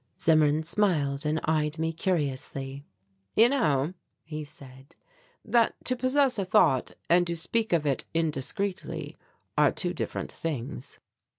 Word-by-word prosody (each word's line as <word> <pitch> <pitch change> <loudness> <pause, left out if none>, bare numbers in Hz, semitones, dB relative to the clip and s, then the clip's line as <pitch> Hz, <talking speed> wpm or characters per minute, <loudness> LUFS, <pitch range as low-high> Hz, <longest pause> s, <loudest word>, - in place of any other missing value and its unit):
Zimmern 155 -1 +4
smiled 155 -6 +1
and 155 +1 +1
eyed 155 0 0
me 160 +1 -1
curiously. 140 -5 -2 0.5
"You 230 +2 +7
know," 155 - +1 0.3
he 155 -1 -6
said, 135 +1 -13 0.5
"that 235 -2 +3
to 255 - +2
possess 255 -1 +2
a - - +1
thought 170 -9 +3
and 175 +1 +4
to 170 - -1
speak 220 +7 0
of 165 -3 +2
it 140 -3 0
indiscreetly 165 +5 -2 0.4
are - - +5
two - - -1
different - - -4
things." 140 -3 -5
160 Hz, 130 wpm, -28 LUFS, 140-190 Hz, 0.5 s, You